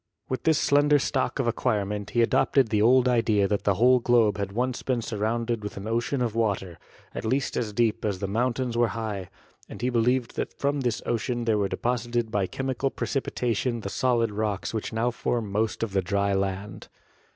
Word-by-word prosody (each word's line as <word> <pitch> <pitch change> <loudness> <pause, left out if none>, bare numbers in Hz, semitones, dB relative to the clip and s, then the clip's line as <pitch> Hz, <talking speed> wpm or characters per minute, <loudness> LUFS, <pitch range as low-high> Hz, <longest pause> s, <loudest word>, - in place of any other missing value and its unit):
With 130 -2 -3
this 160 -2 +4
slender 145 +1 +4
stock 135 -1 -1
of 135 - 0
ac 115 - +1
quirement, 105 -3 -1
he 120 +1 +2
adopted 130 0 +3
the 105 -1 +1
old 125 +3 +5
idea 115 -5 +2
that 100 0 -1
the 100 - +3
whole 125 +5 +5
globe 115 -4 +3
had 100 -1 -2
once 125 +4 -1
been 125 -3 -1
surrounded 115 +1 -1
with 105 - -6
an 100 +2 -6
ocean 120 +3 0
of 115 -3 -1
water, 100 -6 -1 0.3
at - - -5
least 130 +5 0
as 110 -3 -1
deep 115 +1 +1
as 100 -3 -1
the 100 - -3
mountains 120 +3 -1
are 120 0 +3
high, 105 -4 -4 0.4
and - - -9
he 125 - +1
believed 120 +1 +1
that - - -4
from 145 +1 0
this 120 -3 -1
ocean 120 +1 -1
there 110 -2 +2
were 100 -1 0
deposited 120 -1 -1
by 100 -3 0
chemical 135 +2 -2
pre - - -4
cipitation 120 -3 -1
the 100 - -3
solid 115 0 +1
rocks 105 -1 -2
which 110 - -3
now 115 +2 0
form 115 -3 -2
most 110 +2 -1
of 110 -4 -3
the 95 - +2
dry 100 +2 0
land. 95 0 -3
115 Hz, 205 wpm, -26 LUFS, 105-125 Hz, 0.4 s, old